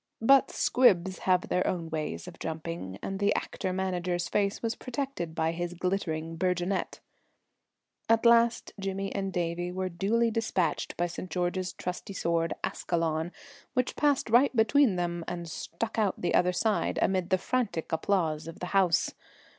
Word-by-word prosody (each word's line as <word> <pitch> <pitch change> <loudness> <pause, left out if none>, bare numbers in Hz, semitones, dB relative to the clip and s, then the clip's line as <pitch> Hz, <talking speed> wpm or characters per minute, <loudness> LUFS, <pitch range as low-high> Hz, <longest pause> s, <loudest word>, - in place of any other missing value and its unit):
But 275 +3 +6
squibs 190 -7 +3
have 180 -1 +3
their 180 - +1
own 165 -3 -2
ways 155 +2 -3
of 180 - -10
jumping, 160 - -5
and 195 0 -3
the 205 0 +2
actor 185 - -2
manager's 180 -2 -1
face 200 +1 0
was 230 0 0
protected 255 - -4
by 160 0 +1
his 175 +1 -4
glittering 165 -3 -2
burgonet. 180 +2 -1 1.1
At 225 +1 +4
last 235 0 +4
Jimmy 195 0 -3
and 195 -1 -2
Davie 175 0 -2
were 185 0 -2
duly 220 +6 +1
despatched 200 -7 -1
by 175 - +1
St. 175 +1 -6
George's 180 +2 -1
trusty 180 +3 -5
sword, 170 -2 0
Ascalon, 165 -1 -1 0.4
which 250 0 0
passed 285 -6 +1
right 255 +3 +5
between 225 0 +4
them 175 -1 -2
and 175 -1 -4
stuck 220 +8 -4
out 205 -3 +2
on - - -13
the 175 - 0
other 180 0 +4
side 210 +4 0
amid 185 -2 +1
the 185 - +4
frantic 220 -5 -2
applause 160 -2 0
of 165 - -8
the - - -3
house. 185 -4 +3
180 Hz, 160 wpm, -29 LUFS, 170-205 Hz, 1.1 s, But